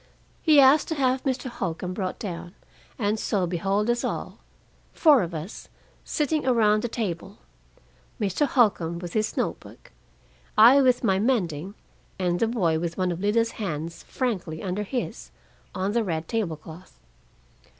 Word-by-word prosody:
He 310 -3 +5
asked 275 +2 +6
to 320 - -2
have 260 -2 +1
Mr. 260 -1 -1
Holcombe 185 -6 -4
brought 185 -1 -3
down, 175 -2 -6 0.4
and 210 -2 0
so 195 -4 0
behold 195 +5 0
us 240 0 +1
all, - - -4 0.5
four 295 -6 +5
of 170 -2 -4
us, 160 +6 -7 0.3
sitting 305 0 -1
around 215 -4 +3
the 240 - -1
table 200 -4 -4 0.8
Mr. 210 - +1
Holcombe 195 -11 +2
with 175 0 -7
his 215 -1 -1
note - - -1
book, - - -16 0.7
I 240 +6 +8
with 255 -2 +3
my 190 -4 +2
mending, 195 - -1 0.4
and 175 -2 0
the 230 - +2
boy 175 -9 +1
with 170 0 -4
one 185 -1 0
of 170 - -4
Lida's 225 +4 +1
hands 165 -3 -4
frankly 185 - -3
under 190 +1 -2
his 245 +5 -4 0.5
on 190 +2 -1
the 235 +1 +1
red 165 -4 -3
table 200 -9 -2
cloth. 160 +4 -13
205 Hz, 155 wpm, -25 LUFS, 175-240 Hz, 0.8 s, I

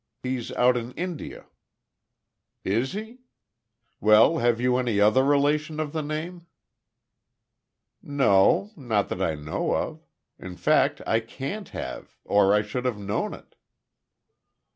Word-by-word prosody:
He's 125 -2 -3
out 125 0 +3
in 120 +1 -5
India." 175 -2 -6 1.2
"Is 115 +7 0
he? 220 +5 -7 0.8
Well 110 +10 +5
have 120 -1 +2
you 125 0 +2
any 120 -5 0
other 110 +6 +4
relation 150 +2 +1
of 155 -1 -3
the 160 - -1
name?" 165 +4 -5 1.5
"No. 135 - +3
Not 115 - -1
that 90 - -4
I 80 -5 0
know 75 +1 -2
of. - - -4 0.4
In 90 -1 -9
fact - - +2
I 115 - +2
can't 135 - -6
have - - -7
or 100 -1 +4
I 105 0 +3
should 125 +5 -5
have 125 -4 -1
known 100 0 -3
it." - - -18
125 Hz, 130 wpm, -25 LUFS, 105-150 Hz, 1.5 s, Well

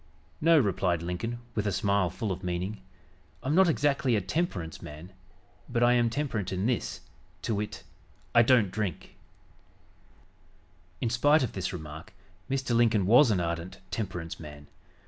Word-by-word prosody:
"No," 165 +1 +6
replied 95 - +1
Lincoln 90 +7 -3 0.2
with 105 -2 -1
a - - +1
smile 100 -1 +1
full 100 +4 -3
of 95 0 -5
meaning, 90 +3 -3 0.6
"I'm 135 - 0
not 185 +1 +5
exactly 140 -5 +2
a - - +3
temperance 95 - -3
man, 75 +5 -10 0.6
but 120 -1 +1
I 120 0 +5
am 120 -1 +3
temperate 115 -7 -2
in 95 +1 -1
this, 120 0 -1 0.4
to 115 - -1
wit: 105 0 -4 0.5
I 120 - +7
don't 115 -5 +4
drink!" 100 -6 -4 1.9
In 115 - 0
spite 145 +5 +4
of 125 - -2
this 95 -2 -3
remark, 80 -3 -8 0.4
Mr. 130 -3 0
Lincoln 115 -4 +3
was 120 +7 +6
an 100 -4 +2
ardent 85 +1 -3
temperance 90 -6 -4
man. 75 -2 -10
105 Hz, 150 wpm, -28 LUFS, 90-120 Hz, 1.9 s, I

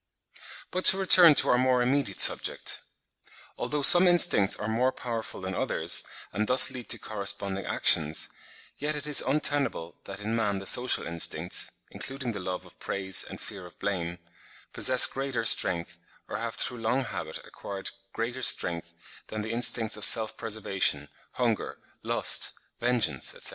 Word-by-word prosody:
But 185 +1 -4
to 190 - +8
return 180 -4 +6
to - - +1
our 125 - +2
more 125 -1 +1
immediate 130 -5 -2
subject. - - +2 0.7
Although 150 -1 -4
some 180 +3 +8
instincts 155 - +3
are 105 - -6
more 120 +4 0
powerful 115 -6 -7
than 95 0 -6
others, - - 0 0.3
and 105 +1 -2
thus 125 +1 +4
lead 125 -2 -10
to - - +1
corresponding 100 -2 -3
actions, 80 0 +1 0.5
yet 150 +1 -3
it 150 0 -4
is 150 -2 +5
untenable, 140 - -2
that 100 0 -8
in 110 +2 -4
man 105 -3 -2
the 95 - -9
social 125 +5 +1
instincts 85 0 -2 0.2
(including 135 -2 -5
the 105 - -7
love 90 -1 -6
of - - -19
praise 95 -1 -1
and - - -11
fear 100 -4 -9
of 90 - -20
blame) 85 -3 -4 0.6
possess 130 -1 +6
greater 135 -4 -3
strength, 85 -5 +3 0.3
or - - -6
have, 115 0 -6
through 125 - -3
long 125 +4 -1
habit, - - -7
acquired 100 -1 -7 0.2
greater 120 +3 -5
strength 85 -7 +1 0.3
than 110 -1 -6
the 110 - -6
instincts 115 -1 +1
of - - -9
self 110 -2 +5
preservation, 95 -10 -1 0.2
hunger, 120 -4 -3 0.2
lust, - - 0 0.3
vengeance, 115 - -1
etc. - - 0
115 Hz, 160 wpm, -26 LUFS, 95-130 Hz, 0.7 s, to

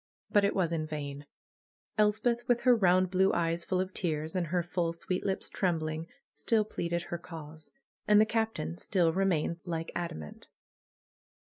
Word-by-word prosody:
But 205 - +5
it 200 - +2
was 180 -4 +1
in 155 -2 -1
vain! 145 -2 -5 0.7
Elspeth, 220 +3 +2
with 240 -1 +3
her 250 -1 +6
round 185 -3 +3
blue 190 +1 +4
eyes 170 0 0
full 185 - 0
of 185 0 -2
tears, 160 -1 -2
and 180 -2 0
her 175 +2 0
full, 170 -1 -1
sweet 180 +2 -3
lips 195 -1 -2
trembling, 160 -3 -1 0.3
still 220 -2 +1
pleaded 170 -4 -2
her 170 0 -5
cause. 160 -2 -10 0.4
And 210 0 +7
the 215 - +6
Captain 220 - -2
still 170 - +2
remained 170 -3 +1
like 165 -2 -3
adamant. 80 - -6
175 Hz, 160 wpm, -30 LUFS, 160-195 Hz, 0.7 s, And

